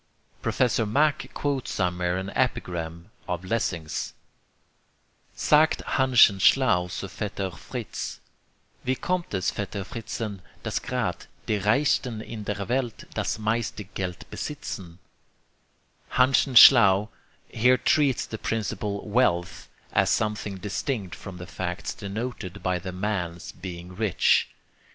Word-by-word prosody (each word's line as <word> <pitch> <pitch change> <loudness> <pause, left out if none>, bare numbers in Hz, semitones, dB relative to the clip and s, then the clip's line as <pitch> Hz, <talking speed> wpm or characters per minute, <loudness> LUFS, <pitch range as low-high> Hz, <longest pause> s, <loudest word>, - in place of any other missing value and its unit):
Professor 120 -2 +1
Mach 145 +8 +1
quotes 140 -3 -1
somewhere 90 -1 0
an 95 +1 -4
epigram 85 -6 -2 0.2
of 90 +1 -3
Lessing's: 90 -7 -2 1.2
Sagt 155 +1 +3
Hanschen 125 -7 +5
Schlau 95 -6 +4
zu 95 +2 -5
Vetter 100 -1 -4
Fritz, - - -6 0.6
"Wie 130 +1 +1
kommt 180 +6 -2
es, 95 -2 0
Vetter 100 -1 -4
Fritzen, 110 -3 -5 0.2
Dass - - -1
grad' - - -2 0.2
die 105 - +2
Reichsten 115 +2 +1
in 110 -1 -7
der 100 -1 -3
Welt, 125 -2 -2
Das - - -1
meiste 110 0 -1
Geld 95 -2 -5
besitzen?" 95 - -6 1.1
Hanschen 130 +1 +3
Schlau 105 -5 +8 0.4
here 125 +3 +3
treats 140 -5 +3
the 110 - -7
principle 105 -2 -2
'wealth' 100 -6 +1 0.2
as - - +3
something 105 -2 -1
distinct 100 +1 -3
from 95 -3 -8
the 90 - -7
facts 90 0 -4
denoted 100 -2 -5
by 90 0 0
the 95 +1 -6
man's 90 -3 -3
being 90 -1 -8
rich. 105 -2 +3
105 Hz, 120 wpm, -26 LUFS, 90-120 Hz, 1.2 s, Schlau